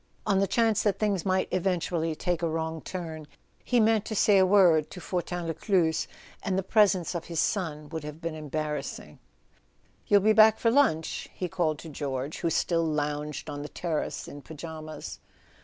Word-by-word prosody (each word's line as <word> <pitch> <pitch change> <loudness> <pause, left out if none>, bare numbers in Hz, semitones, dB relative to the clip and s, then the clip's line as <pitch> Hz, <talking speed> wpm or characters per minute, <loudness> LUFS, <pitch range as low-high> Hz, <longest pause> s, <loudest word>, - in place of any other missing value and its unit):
On 195 -1 +2
the 195 - +2
chance 225 0 +2
that 205 -2 +1
things 200 -4 0
might 185 0 +1
eventually 175 -3 0
take 175 +1 -1
a 170 - 0
wrong 160 0 -3
turn 160 -4 -6 0.4
he 245 - +2
meant 220 -1 +3
to 215 - -4
say 200 -1 +5
a 190 - +6
word 180 -6 +5
to 180 - -9
Fortin 175 -1 -3
Lescluze; 165 -1 +1 0.3
and 190 -3 -1
the 190 - 0
presence 195 -4 +3
of 170 -2 -4
his 170 -2 -3
son 160 -5 -1
would 160 -1 -5
have 150 +1 -7
been 165 -1 -4
embarrassing. 150 -2 -5 0.9
"You'll 205 -1 +5
be 215 +2 +4
back 220 0 +7
for 230 - +2
lunch?" 230 - +1
he 180 - -3
called 170 -4 0
to 160 - -10
George, 140 -1 -4
who 170 - 0
still 165 +1 +1
lounged 150 -1 -2
on 145 -1 -5
the 150 - -6
terrace 165 -4 -3
in 145 - -9
pyjamas. 155 0 -8
170 Hz, 180 wpm, -28 LUFS, 155-195 Hz, 0.9 s, back